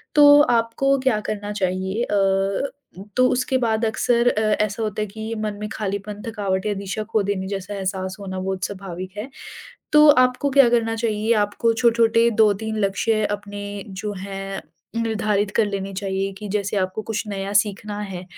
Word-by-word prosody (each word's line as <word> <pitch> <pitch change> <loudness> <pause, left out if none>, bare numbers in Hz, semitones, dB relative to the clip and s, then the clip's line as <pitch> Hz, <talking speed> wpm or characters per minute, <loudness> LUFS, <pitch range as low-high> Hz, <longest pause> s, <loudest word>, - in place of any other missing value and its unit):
तो 290 -1 +8
आपको 245 +2 +2
क्या 260 -5 +1
करना 205 -1 -3
चाहिए 190 +2 -1
अ, 195 +4 +1 0.5
तो 255 0 +5
उसके 255 +1 +1
बाद 225 -2 +1
अक्सर 235 +2 +2
अ, 215 - 0 0.2
ऐसा 215 +2 -4
होता 215 -1 -2
है 210 - -1
कि 220 +2 -6
मन 215 -1 -3
में 210 - -3
खालीपन, 205 0 -4
थकावट 200 -4 -2
या 210 - +1
दिशा 200 +1 -4
खो 215 -1 0
देने 190 -1 -2
जैसा 195 0 -4
एहसास 190 -1 -3
होना 190 -2 -5
बहुत 190 0 -2
स्वाभाविक 185 -1 -7
है। 215 +6 -5 0.6
तो 300 0 +8 0.2
आपको 250 +3 -2
क्या 275 -2 +6
करना 225 -1 +1
चाहिए 220 -1 0
आपको 230 +3 0
छोटे-छोटे 230 0 +3
2-3 220 +1 +1
लक्ष्य 215 +2 0
अपने 205 0 -9 0.3
जो 200 +2 -5
हैं 195 0 -5 0.4
निर्धारित 210 -2 0
कर 225 - +4
लेने 195 -1 -4
चाहिए 195 0 -2
कि 210 - -7
जैसे 205 0 -1
आपको 185 +2 -1
कुछ 225 -1 -2
नया 195 -1 -4
सीखना 205 0 0
है। 190 -3 -6
210 Hz, 170 wpm, -22 LUFS, 195-225 Hz, 0.6 s, तो